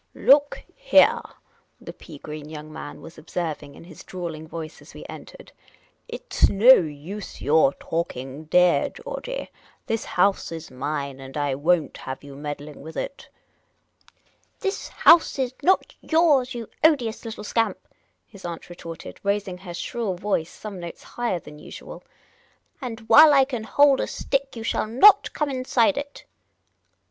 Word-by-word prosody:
Look 285 +1 +4
heah," - - +4 0.6
the - - -9
pea - - -12
green 150 0 -8
young 155 0 -9
man 145 -1 -8
was 165 - -12
observing, 150 -5 -5
in - - -13
his 170 -2 -13
drawling 165 -4 -6
voice, 160 -1 -8
as - - -16
we - - -10
entered; - - -11 0.3
" - - -36
it - - -9
's - - +4
no 225 +6 +8
use 170 - -3
your 145 -1 +3
talking, 145 -3 -5
deah 175 -2 +3
Georgey. - - -7 0.3
This 225 0 -2
house 195 0 +1
is 165 -3 -8
mine, 140 +1 -4
and 135 +2 -9
I 145 -2 0
won't 160 +4 +1
have 130 +1 -7
you 140 -1 -11
meddling 145 +1 -7
with 160 +2 -10
it." 280 - -6 0.7
" - - -34
This 390 -1 -2
house 335 -3 +5
is 260 -2 -1
not 375 +6 +2
yours, 295 -7 +3
you 230 -2 -6 0.2
odious 255 -8 +2
little 220 -2 -7
scamp," 225 +2 0 0.5
his 200 -3 -15
aunt 170 0 -7
retorted, 165 -2 -9
raising 200 -2 -2
her 180 -2 -9
shrill 220 0 -3
voice 180 -3 -1
some 205 -3 -9
notes 170 -1 -8
higher 240 -6 -2
than 150 -2 -12
usual; - - -10 0.4
" - - -38
and 235 -3 -6
' - - -6
ile 305 0 +9
I 270 -1 +6
can 245 -5 -5
hold 285 +2 +4
a - - -1
stick 275 -1 -2
you 225 - -6
shall 225 - -1
not 385 - +6
come 300 -2 -1
inside 255 0 +2
it." 285 0 -7
190 Hz, 165 wpm, -24 LUFS, 155-260 Hz, 0.7 s, ile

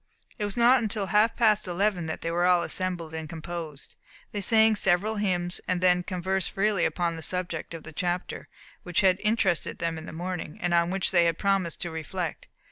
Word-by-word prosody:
It 210 - 0
was 205 +1 -5
not 240 +2 +5
until 215 -2 -2
half 210 +4 +3
past 215 -4 +3
eleven 180 -1 0
that 160 - -4
they 165 - -2
were 175 +1 +2
all 180 -1 +4
assembled 175 -4 -2
and 160 -1 -5
composed. 160 -3 -6 0.4
They 205 - -3
sang 220 +1 +5
several 200 +3 +2
hymns, 180 -3 -1
then 180 0 +3
conversed 185 +1 -1
freely 200 -2 +1
upon 170 -2 -1
the 160 - -7
subject 175 -1 -3
of 160 - -9
the 160 - -10
chapter, 175 +3 -3 0.3
which 175 -2 0
had 185 -1 +4
interested 210 -5 +1
them 165 -1 -2
in 160 - -10
the - - -7
morning, 175 -1 -5
and 175 0 0
on 170 0 +3
which 190 0 0
they 175 -2 +4
had 165 -1 +1
promised 195 -4 0
to 170 - -3
reflect. 160 +2 -5
180 Hz, 200 wpm, -27 LUFS, 170-200 Hz, 0.4 s, not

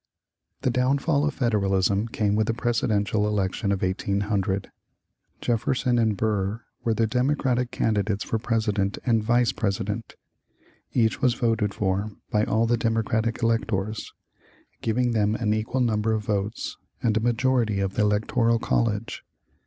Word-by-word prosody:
The 125 - +2
downfall 140 +4 +2
of 150 - -1
Federalism 100 -3 +1
came 105 -3 0
with 110 0 +1
the 115 - 0
presidential 110 -3 +1
election 100 -1 -1
of 95 -1 -1
1800. 100 +1 -1 0.7
Jefferson 120 +1 +1
and 110 -3 +1
Burr 105 +1 -1 0.2
were 115 -2 +1
the 115 - +2
Democratic 125 0 +1
candidates 105 -3 0
for 115 - -2
President 110 -4 0
and 115 -4 +2
Vice 120 +1 +3
President. 105 +1 -3 0.8
Each 115 0 +1
was 125 -3 +3
voted 110 -4 0
for 100 +1 0 0.2
by 105 0 +2
all 110 +1 +2
the 120 +1 +2
Democratic 115 +1 0
electors, 110 -2 -1 0.7
giving 120 +2 +1
them 105 -1 +1
an 105 -3 0
equal 110 +4 -1
number 110 -2 +1
of 110 -2 -2
votes 100 0 -2 0.3
and 110 -3 +2
a - - +3
majority 120 -2 +1
of 95 -1 -1
the - - 0
electoral 110 +3 +2
college. 115 -1 -1
110 Hz, 140 wpm, -25 LUFS, 105-120 Hz, 0.8 s, Vice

